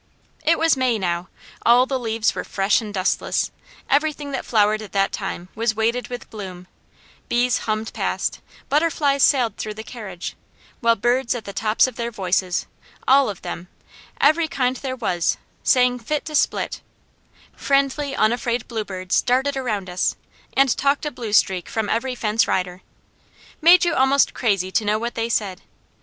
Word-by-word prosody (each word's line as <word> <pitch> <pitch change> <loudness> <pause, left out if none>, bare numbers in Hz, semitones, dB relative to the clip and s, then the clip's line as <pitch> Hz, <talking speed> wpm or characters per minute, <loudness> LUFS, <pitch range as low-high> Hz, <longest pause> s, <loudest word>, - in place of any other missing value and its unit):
It 330 +1 +3
was 325 -1 +3
May 255 -3 +1
now, 175 -2 -2 0.3
all 245 +2 +6
the 265 -1 -2
leaves 225 -2 0
were - - -4
fresh 195 +4 +1
and 215 -2 -7
dustless, 190 -2 0 0.4
everything 295 0 0
that 270 - -3
flowered 215 -1 +3
at 215 - -10
that 195 -1 +2
time 185 -3 -5
was 225 0 0
weighted 230 +3 0
with 245 -1 -7
bloom, 185 -5 -8 0.6
bees 245 0 +2
hummed 215 +1 -2
past, - - -2 0.3
butterflies 290 -2 +2
sailed 245 -8 +3
through 215 -1 -5
the 220 - -7
carriage, 205 -8 -7 0.4
while 230 -2 +3
birds 240 +3 +1
at 230 - -6
the 200 - -7
tops 215 +1 +3
of 255 -3 -5
their 235 0 -2
voices, 185 -4 -1 0.4
all 275 -1 +5
of 200 - -7
them, 175 - -6 0.5
every 315 +3 +4
kind 255 -4 0
there 260 -1 -4
was, 180 -9 0 0.2
sang 250 -1 +3
fit 295 +6 -2
to 310 - -6
split; - - 0 0.7
friendly, 275 0 0
unafraid 235 +1 0
bluebirds 190 -5 -1
darted 265 +3 +1
around 215 -8 -2
us, 180 0 0 0.4
and 270 -2 +4
talked 280 +2 +1
a 295 - -2
blue 235 -5 -6
streak 190 -4 +2
from 220 -2 -2
every 250 +3 -1
fence 220 -1 +1
rider. 180 0 -1 0.8
Made 345 +2 +7
you 340 - +1
almost 270 +1 +3
crazy 195 -5 0
to 215 - +1
know 210 +1 +1
what 235 +2 -3
they 230 0 -2
said. 200 -5 -1
230 Hz, 165 wpm, -22 LUFS, 205-265 Hz, 0.8 s, Made